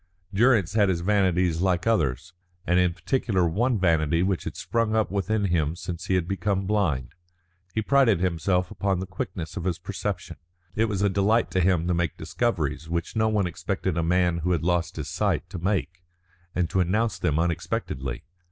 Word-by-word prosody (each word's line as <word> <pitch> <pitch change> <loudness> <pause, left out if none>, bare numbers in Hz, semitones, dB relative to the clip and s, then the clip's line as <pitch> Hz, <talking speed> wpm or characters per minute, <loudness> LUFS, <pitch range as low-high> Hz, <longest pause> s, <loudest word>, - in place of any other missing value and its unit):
Durrance 110 -4 +3
had 105 -3 +3
his 85 -2 0
vanities 90 -4 +2
like 90 -2 +1
others; 80 - 0 0.3
and 90 +1 +3
in 90 -1 +3
particular 95 -2 0
one 115 +8 +1
vanity 85 -2 +2
which 95 -2 -1
had - - -5
sprung 115 -2 0
up 110 -3 +1
within 100 +2 0
him 80 -4 +1
since 90 -1 -6
he 95 - +2
had 90 -2 0
become 95 0 -1
blind. 80 - 0 0.6
He 110 - 0
prided 130 -7 +4
himself 90 +1 0
upon 95 -2 -1
the 95 - -3
quickness 90 -2 -5
of 85 - -4
his 90 -3 0
perception. 95 0 -5 0.4
It 110 +4 +2
was 100 -3 -1
a - - +4
delight 100 +4 +2
to 95 - +1
him 90 -2 +2
to 90 - +2
make 85 -2 -1
discoveries 80 - -2
which 85 +4 -3
no 110 0 +2
one 105 -3 +1
expected 90 +1 -2
a 85 - +1
man 85 0 +2
who 90 +2 0
had 80 - -1
lost 85 0 0
his 75 -3 -5
sight - - -1
to 90 - -5
make, 85 -2 -1 0.5
and 90 -2 +1
to 95 - +1
announce 105 +5 +1
them 75 - +1
unexpectedly. 80 - -2
90 Hz, 190 wpm, -25 LUFS, 85-100 Hz, 0.6 s, prided